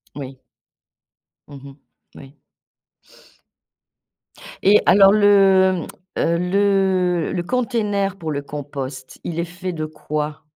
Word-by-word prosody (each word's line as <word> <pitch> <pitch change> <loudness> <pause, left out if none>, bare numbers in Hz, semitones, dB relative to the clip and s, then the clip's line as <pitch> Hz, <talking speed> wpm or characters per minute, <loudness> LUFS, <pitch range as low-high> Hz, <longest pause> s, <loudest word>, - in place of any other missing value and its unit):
Oui. 135 -2 -8 1.1
Mmh 140 -2 -12
mh. 135 - -16 0.4
Oui. 140 +1 -14 2.3
Et 205 +2 +5
alors 195 0 +6
le, 195 -3 +4 0.3
mmh, - - -3
heu, 170 0 +1
le 185 -2 +1
le 175 - -2
container 210 -4 -1
pour 160 -3 -5
le 140 -1 -3
compost, 140 -2 -8
il 170 -1 -4
est - - 0
fait 180 +1 -6
de 155 -1 -4
quoi? 150 0 -5
175 Hz, 115 wpm, -20 LUFS, 150-195 Hz, 2.3 s, alors